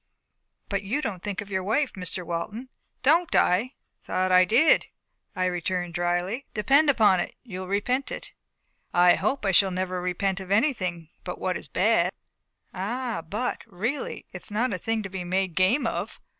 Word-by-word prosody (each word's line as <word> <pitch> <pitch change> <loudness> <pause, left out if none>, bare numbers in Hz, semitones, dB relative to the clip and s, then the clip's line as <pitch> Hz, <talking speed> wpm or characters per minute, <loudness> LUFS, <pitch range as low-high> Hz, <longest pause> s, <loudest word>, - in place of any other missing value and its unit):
"But 200 -1 -1
you 205 +9 -1
don't 205 -11 -4
think 205 -1 -3
of 205 0 -10
your 190 -1 0
wife, 250 +8 +1
Mr. 180 -1 -2
Walton." 205 +10 -4 0.3
"Don't 325 +5 +4
I? 180 - +5
I 245 +6 -4 0.3
thought 185 0 0
I 185 0 +7
did," 305 - +4 0.5
I 185 - 0
returned 180 0 -2
dryly. 175 +9 -1
"Depend 275 +8 +4
upon 215 -8 +5
it, - - -3
you'll 185 -6 -7
repent 245 +8 0
it." - - -6 0.6
"I 175 0 +7
hope 270 -5 -1
I 195 - +3
shall 190 +1 +5
never 185 0 -2
repent 190 +2 -1
of 190 -1 -8
anything 190 - 0
but - - -5
what - - -1
is - - -6
bad." - - +2 0.6
"Ah! 230 +4 -3
but, 230 +5 -2
really! 225 +8 -3
it's 180 +4 -4
not 230 +3 0
a 185 - -3
thing 225 +3 -1
to 195 - -5
be 190 -1 -5
made 185 0 -1
game 190 - +3
of." - - -3
195 Hz, 175 wpm, -26 LUFS, 180-235 Hz, 0.6 s, I